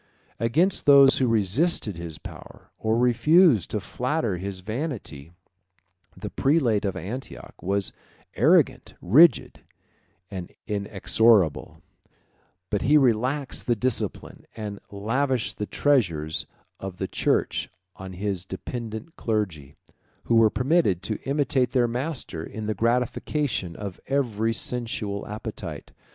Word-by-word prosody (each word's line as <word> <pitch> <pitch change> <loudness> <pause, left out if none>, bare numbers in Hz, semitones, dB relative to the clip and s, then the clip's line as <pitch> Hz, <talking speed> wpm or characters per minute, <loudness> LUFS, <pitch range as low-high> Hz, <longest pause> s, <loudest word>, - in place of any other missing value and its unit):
Against 160 +13 +1
those 140 -1 +7
who 130 - +2
resisted 110 - +1
his 85 -2 -6
power, - - -12
or 110 +1 +1
refused 125 - +4
to 105 - -1
flatter 120 - -2
his 95 +1 -6
vanity, 110 - -5 0.9
the - - -6
prelate 135 -8 +2
of 95 - -1
Antioch 125 +8 -7
was 100 +1 -1 0.4
arrogant, - - +2
rigid, 150 - +5 0.7
and 90 -3 -6
inexorable; 100 -2 +1 0.9
but 105 - 0
he 150 +3 +5
relaxed 130 +2 0
the 120 - +3
discipline, 125 +2 -3
and 105 -2 -6
lavished 120 +5 -1
the 105 - -2
treasures 85 - 0 0.3
of 95 -2 -7
the - - -3
church - - 0 0.3
on 95 0 -9
his 95 -1 -3
dependent 110 - -7
clergy, 90 - -2 0.5
who - - -1
were 115 -1 +6
permitted 125 - +1
to 110 +2 -3
imitate 135 -3 +1
their 125 -3 +3
master 125 - -4
in 110 +5 -7
the 110 - -1
gratification 115 - -1
of 100 -3 -7
every 115 -5 0
sensual 115 -4 -4
appetite. 105 +1 -7
110 Hz, 115 wpm, -25 LUFS, 100-130 Hz, 0.9 s, those